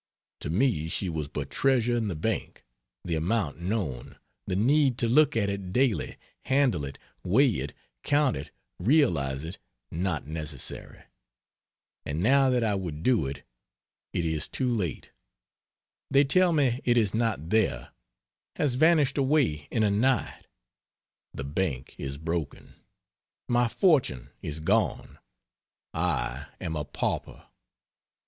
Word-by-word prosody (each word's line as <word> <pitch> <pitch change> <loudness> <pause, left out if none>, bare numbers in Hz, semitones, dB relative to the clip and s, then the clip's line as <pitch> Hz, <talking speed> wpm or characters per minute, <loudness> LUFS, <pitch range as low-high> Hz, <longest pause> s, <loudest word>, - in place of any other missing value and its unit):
To - - -5
me 90 - +1
she 95 +2 -2
was 80 -3 -3
but 70 -1 -5
treasure 125 -3 +2
in 115 -2 0
the 95 - -3
bank; 110 +8 -3 0.4
the 85 - -2
amount 85 0 0
known, 85 - -3 0.3
the 90 - -1
need 130 +4 +3
to 120 - +1
look 145 +2 +4
at 100 -3 +2
it 100 -2 -4
daily, 125 0 +1 0.3
handle 130 - +2
it, 70 0 -8 0.3
weigh 125 +8 +4
it, 70 +2 -5 0.3
count 145 - +2
it, - - -6 0.3
realize 85 - +2
it, 85 +4 -7 0.3
not 85 -3 -2
necessary; 75 -3 -6 1.0
and 75 +3 -3
now 135 +3 +5
that 125 -2 +2
I 110 -2 +1
would 85 -6 -4
do 115 - +3
it, 70 0 -7 0.7
it 85 - -1
is 80 -2 -1
too 125 -2 -1
late; 90 -9 -3 1.0
they 140 0 +5
tell 180 +6 +4
me 135 -6 +2
it 120 -1 +3
is 105 -4 +2
not 110 -9 -1
there, 110 -2 +1 0.6
has 145 -4 +1
vanished 150 0 +3
away 130 - +1
in 110 - +1
a 105 - +3
night, 125 +6 0 0.8
the 70 - -6
bank 70 -2 -2
is 70 0 -4
broken, 80 -1 -4 0.7
my 120 0 +3
fortune 115 - +2
is 75 +1 -5
gone, 80 - 0 0.7
I 80 -7 -1
am 80 -3 -4
a 75 -2 -2
pauper. - - -3
100 Hz, 140 wpm, -27 LUFS, 80-130 Hz, 1.0 s, now